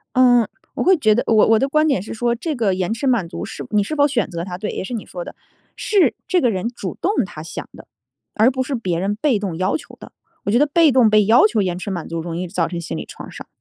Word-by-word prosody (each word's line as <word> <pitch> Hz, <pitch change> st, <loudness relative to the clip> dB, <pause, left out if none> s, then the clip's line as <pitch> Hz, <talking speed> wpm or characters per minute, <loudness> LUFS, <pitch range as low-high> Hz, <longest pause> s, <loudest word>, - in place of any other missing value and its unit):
嗯， 245 Hz, -3 st, +5 dB, 0.3 s
我 -, -, -2 dB
会 380 Hz, 0 st, +5 dB
觉 215 Hz, -9 st, +3 dB
得， 240 Hz, -, +1 dB
我 -, -, +2 dB
我 225 Hz, 0 st, +4 dB
的 270 Hz, +4 st, 0 dB
观 305 Hz, +2 st, +2 dB
点 270 Hz, -11 st, +1 dB
是 205 Hz, -, -8 dB
说 235 Hz, +1 st, 0 dB
这 305 Hz, +6 st, -3 dB
个 220 Hz, -7 st, +1 dB
延 185 Hz, +3 st, -2 dB
迟 270 Hz, +4 st, -3 dB
满 230 Hz, -9 st, +1 dB
足 -, -, -6 dB
是 -, -, -7 dB
你 210 Hz, -1 st, +2 dB
是 200 Hz, -, -4 dB
否 285 Hz, 0 st, +4 dB
选 245 Hz, -8 st, 0 dB
择 170 Hz, -1 st, -4 dB
它， 180 Hz, -1 st, -6 dB
对， 210 Hz, +2 st, -3 dB
也 -, -, -4 dB
是 245 Hz, -, -7 dB
你 220 Hz, -, -5 dB
说 175 Hz, -1 st, -7 dB
的， -, -, -10 dB, 0.4 s
是 400 Hz, -4 st, +2 dB
这 365 Hz, -, +3 dB
个 245 Hz, -, +2 dB
人 200 Hz, +2 st, -2 dB
主 205 Hz, -6 st, -6 dB
动 385 Hz, -, +1 dB
他 155 Hz, -6 st, -9 dB
想 165 Hz, -, -7 dB
的， -, -, -14 dB, 0.5 s
而 220 Hz, +4 st, +4 dB
不 260 Hz, 0 st, -2 dB
是 270 Hz, +1 st, -4 dB
别 185 Hz, -8 st, -2 dB
人 195 Hz, +3 st, -1 dB
被 255 Hz, -1 st, +1 dB
动 195 Hz, -5 st, -4 dB
要 185 Hz, +2 st, 0 dB
求 -, -, -11 dB
的。 -, -, -12 dB, 0.3 s
我 -, -, -1 dB
觉 230 Hz, -, +3 dB
得 295 Hz, -, +4 dB
被 315 Hz, +1 st, +4 dB
动 245 Hz, -3 st, +5 dB
被 215 Hz, -1 st, +4 dB
要 225 Hz, +3 st, +6 dB
求 215 Hz, -1 st, 0 dB
延 180 Hz, -2 st, -2 dB
迟 200 Hz, -, -5 dB
满 175 Hz, -4 st, -4 dB
足 165 Hz, 0 st, -3 dB
容 165 Hz, 0 st, -5 dB
易 180 Hz, 0 st, -4 dB
造 170 Hz, -2 st, 0 dB
成 175 Hz, -2 st, -5 dB
心 -, -, -5 dB
理 -, -, -6 dB
创 -, -, -10 dB
伤。 -, -, -10 dB
220 Hz, 310 characters per minute, -20 LUFS, 185-255 Hz, 0.5 s, 要